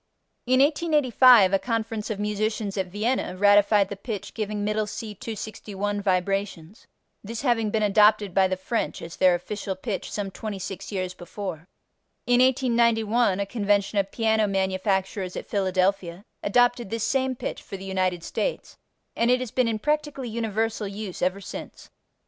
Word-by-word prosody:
In 255 +1 +4
1885 265 - +5
a 195 - +4
conference 225 -2 -3
of 210 -2 -3
musicians 210 0 -2
at 190 -2 -1
Vienna 205 0 -2
ratified 205 0 +5
the 200 - -5
pitch 205 0 -6
giving 210 -2 -3
Middle 210 0 0
C 215 0 -6
261 205 -1 -5
vibrations, 195 -1 -2 0.4
this 230 +4 -6
having 230 -5 +2
been 215 0 0
adopted 210 -1 +4
by 190 0 +4
the 185 0 -2
French 205 +5 -2
as 165 0 -8
their 185 -1 +5
official 195 +2 -4
pitch 195 +1 -5
some 200 -2 -3
26 195 -2 -6
years 185 -2 -3
before. 180 -2 -7 0.6
In 245 0 +4
1891 235 -5 +2
a 200 - 0
convention 205 -1 +1
of 195 0 -1
piano 220 -2 +2
manufacturers 190 -1 -1
at - - -5
Philadelphia 190 -2 0 0.2
adopted 245 0 +2
this 225 0 -2
same 265 -1 0
pitch - - -5
for 195 - -8
the 190 - -9
United 185 -2 -1
States, - - -4 0.4
and 235 - +2
it 250 0 +4
has 255 -3 -5
been 255 -2 +1
in 225 -1 0
practically 295 0 -2
universal 225 -1 -2
use 200 -1 -6
ever 185 +2 0
since. - - -9
210 Hz, 155 wpm, -25 LUFS, 195-230 Hz, 0.6 s, 1885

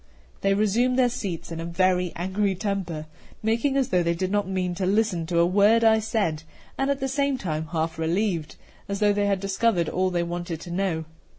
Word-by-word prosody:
They 195 0 +2
resumed 230 +5 +2
their 250 -2 +4
seats 185 -8 -5
in 165 - -5
a - - -3
very 180 +1 +1
angry 190 +3 0
temper, 185 -6 -3 0.4
making 235 +6 +1
as 265 -3 +1
though 180 -1 +3
they 170 0 +1
did 185 +2 -2
not 205 -2 +1
mean 185 -2 -1
to 185 +1 -2
listen 195 -5 +1
to 170 0 -1
a 170 - +5
word 205 +5 +4
I 220 -1 +5
said, 205 -8 -1 0.3
and 270 +1 0
at 280 -1 0
the 270 - -1
same 280 0 0
time 160 -7 -3
half 160 0 -2
relieved, 170 0 -1 0.3
as 200 0 -2
though 205 -1 +4
they 205 0 +1
had 200 -1 +1
discovered 195 -2 +1
all 185 +1 +1
they 175 -1 0
wanted 175 -1 -4
to 175 - -8
know. 175 -3 -1
190 Hz, 210 wpm, -25 LUFS, 170-215 Hz, 0.4 s, a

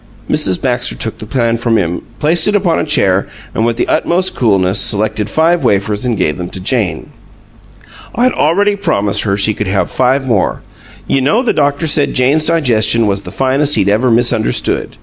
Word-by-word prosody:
Mrs. 95 -2 +1
Baxter 125 -1 0
took 110 - -2
the 110 - -9
pan 115 -1 0
from 115 -1 0
him, 85 -3 -2 0.2
placed 160 +2 +2
it 210 - +1
upon 185 -5 +1
a - - -2
chair, 100 -10 +1 0.3
and 110 - -1
with 115 -1 -2
the - - -1
utmost 185 +2 0
coolness 100 -4 +1
selected 105 0 0
five 165 +5 +1
wafers 105 +3 0
and 120 -3 -1
gave 85 -3 -1
them 90 0 -5
to - - -6
Jane. 105 0 -2 1.0
"I'd 250 +2 +1
already 200 +7 +1
promised 100 - -1
her 100 -2 -1
she 105 +2 +2
could 105 -1 -4
have 95 +1 -1
five 130 +1 0
more. 115 -7 -1 0.4
You 135 - 0
know 215 - +1
the 245 - 0
doctor 145 +1 0
said 150 -2 +1
Jane's 140 +5 +2
digestion 115 -8 +2
was 100 -1 -1
the - - -10
finest 140 +2 +1
he'd 100 - +1
ever 110 +5 +1
misunderstood. 115 -1 0
120 Hz, 190 wpm, -13 LUFS, 100-150 Hz, 1.0 s, placed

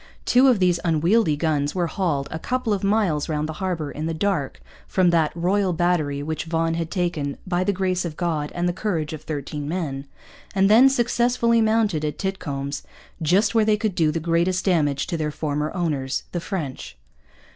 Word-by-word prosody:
Two 255 +2 +5
of 250 -4 +5
these 180 -2 +2
unwieldy 165 +2 +2
guns 145 -1 0
were 180 -2 +1
hauled 160 -6 -1
a 160 - -4
couple 250 +2 -1
of 200 - -2
miles 195 -8 +1
round 155 0 -1
the 160 - -5
harbour, 170 -6 -2
in 155 +2 -4
the 165 - -2
dark, 165 -5 -1 0.3
from 185 -2 +3
that 160 -3 +2
'Royal 185 +2 +1
Battery' 160 -5 0
which 160 +1 -3
Vaughan 165 0 0
had 165 -1 -2
taken 165 -7 -2
'by 180 -1 0
the 200 - +1
Grace 185 -1 -1
of 165 -3 -5
God 160 -4 -1
and 175 0 0
the 175 - 0
courage 175 -6 -2
of 155 - -6
13 145 -1 -5
Men,' 145 -6 -3 0.5
and 195 +1 +4
then 250 +5 +8
successfully 240 -2 +2
mounted 215 -7 +2
at 150 -1 -2
'Titcomb's,' 145 -8 -3 0.4
just 195 +7 +3
where 225 -1 +4
they 210 0 +3
could 215 -2 -1
do 160 -3 +2
the 165 - -1
greatest 170 +3 0
damage 150 -7 +1
to 170 - -3
their 155 -1 -1
former 150 0 -2
owners, 145 -7 -1
the 175 - -3
French. 145 - -5
170 Hz, 190 wpm, -23 LUFS, 150-195 Hz, 0.5 s, then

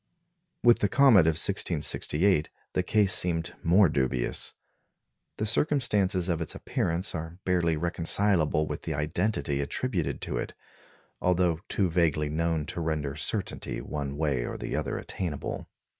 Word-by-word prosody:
With 120 -1 +5
the 100 - +1
comet 120 - +5
of 80 -1 +2
1668 85 -1 +2 0.2
the - - +1
case 100 +1 +3
seemed 85 -2 0
more 90 +4 +5
dubious. 65 -5 -1 0.8
The 110 - -2
circumstances 105 - +1
of 85 -2 -1
its 80 - -2
appearance 85 +4 -1
are 80 +1 -6
barely 85 -3 +1
reconcilable 85 -1 +3
with - - -5
the - - -4
identity 75 -1 -1
attributed 70 - -2
to - - -3
it, - - -6 0.7
although 90 -2 +1
too 100 - +1
vaguely 80 -3 +1
known 80 0 -1
to 85 +1 -5
render 75 -3 -2
certainty 75 - -2
one 70 +3 -5
way 70 -6 0
or - - -5
the - - -4
other - - -2
attainable. 85 -7 -5
85 Hz, 140 wpm, -27 LUFS, 75-95 Hz, 0.8 s, With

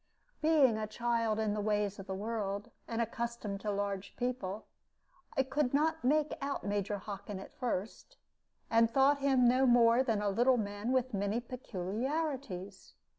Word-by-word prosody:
Being 290 -8 +4
a 215 - -2
child 230 0 0
in 215 -1 0
the 210 - -1
ways 205 -1 0
of 195 - -8
the 190 - -3
world, 205 -1 -3 0.2
and 230 0 0
accustomed 230 -3 -4
to 210 - -3
large 200 -1 -3
people, 240 -5 -3 0.7
I 270 - +4
could 270 0 0
not 320 +2 +1
make 300 +3 +2
out 280 0 -3
Major 205 0 -1
Hockin 200 0 -6
at 195 - -11
first, 240 - -4 0.5
and 230 0 +5
thought 275 +4 +4
him 265 -3 +4
no 255 +2 +4
more 240 0 +6
than 225 -5 +1
a 205 0 0
little 245 +5 +3
man 205 +2 -2
with 255 -1 +1
many 200 +3 0
peculiarities. 240 - -4
230 Hz, 160 wpm, -33 LUFS, 205-260 Hz, 0.7 s, more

